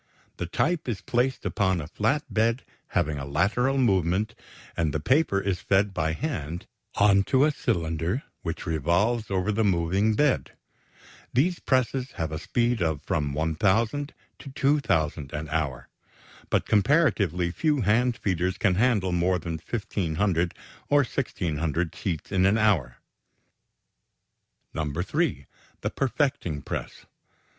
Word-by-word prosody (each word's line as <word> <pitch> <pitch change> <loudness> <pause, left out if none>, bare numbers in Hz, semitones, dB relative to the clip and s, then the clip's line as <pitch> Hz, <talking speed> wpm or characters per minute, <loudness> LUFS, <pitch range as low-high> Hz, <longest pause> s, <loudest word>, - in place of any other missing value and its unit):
The 85 - -3
type 160 - 0
is 105 -5 -2
placed 125 +4 0
upon 95 -3 +1
a 75 - -5
flat 115 - 0
bed 115 +3 +1 0.3
having 75 -4 0
a 70 - -5
lateral 120 - +1
movement, 100 -2 +2 0.4
and 80 -3 0
the - - +1
paper 130 - +2
is 95 -2 -1
fed 100 0 +2
by 80 -2 0
hand 85 - -4 0.3
onto 100 +7 +4
a 155 - +3
cylinder 85 - -1 0.2
which 85 0 -4
revolves 90 - +1
over 95 +1 0
the 110 +2 +1
moving 95 +3 +2
bed. 145 +2 +1 0.8
These 170 +8 +2
presses 130 0 0
have 80 -1 -3
a 80 - -3
speed 120 +2 0
of 80 -4 0
from 75 -7 -1
1,000 105 - 0 0.2
to 140 - -9
2,000 95 - 0
an 75 +1 -4
hour, 75 -5 -2 0.6
but - - +1
comparatively 105 - +2
few 150 - +1
hand 115 +3 +2
feeders 95 -3 -1
can 100 -4 +2
handle 105 -3 +2
more 90 +1 +2
than 85 -2 -5
1,500, 90 -5 -1 0.3
or 145 0 +5
1,600 85 - -2
sheets 85 -3 -4
in 95 -1 +3
an 100 +3 +3
hour. 85 - +2 1.8
(3) 80 - -1 0.4
The - - -1
perfecting 130 - -1
press. - - -6
95 Hz, 130 wpm, -26 LUFS, 80-120 Hz, 1.8 s, or